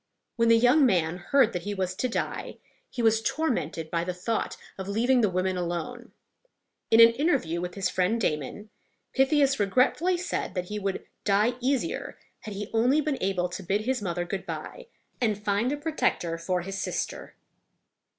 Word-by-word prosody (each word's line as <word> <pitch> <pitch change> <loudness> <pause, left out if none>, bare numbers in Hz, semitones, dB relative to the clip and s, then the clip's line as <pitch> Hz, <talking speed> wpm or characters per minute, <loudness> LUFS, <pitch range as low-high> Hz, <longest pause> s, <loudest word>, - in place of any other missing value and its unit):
When 230 -1 +2
the 230 - +7
young 250 +6 +5
man 175 -8 +2
heard 235 +5 +2
that 180 - -2
he 205 +3 -4
was 185 -1 -1
to 255 - 0
die, - - -3 0.3
he 240 - -4
was 225 0 +4
tormented 170 - -2
by 170 0 0
the 180 0 -3
thought 220 +5 -2 0.2
of 190 -1 -6
leaving 240 +5 +2
the 210 - +3
women 185 0 -1
alone. 180 +8 -4 0.8
In 225 - +5
an 230 0 +10
interview 235 - 0
with 180 0 -5
his 195 -2 0
friend 185 +5 +1
Damon, 175 +4 -3 0.4
Pythias 275 0 +3
regretfully 255 - +2
said 345 - -3
that 180 -1 -3
he 210 0 -3
would 195 -1 -3 0.2
die 210 +4 +3
easier 270 +5 -1 0.2
had 210 -2 -8
he 205 +1 -6
only 245 +6 +3
been 300 -2 -1
able 185 -2 0
to 180 +2 -6
bid 195 +3 0
his 255 +2 -1
mother 175 -2 -2
good 190 +2 -5
by - - -7 0.3
and 215 -4 +1
find 205 +5 +1
a 290 - -1
protector 290 - -1
for 180 +1 -1
his 195 +1 -5
sister. - - -4
210 Hz, 180 wpm, -27 LUFS, 180-250 Hz, 0.8 s, an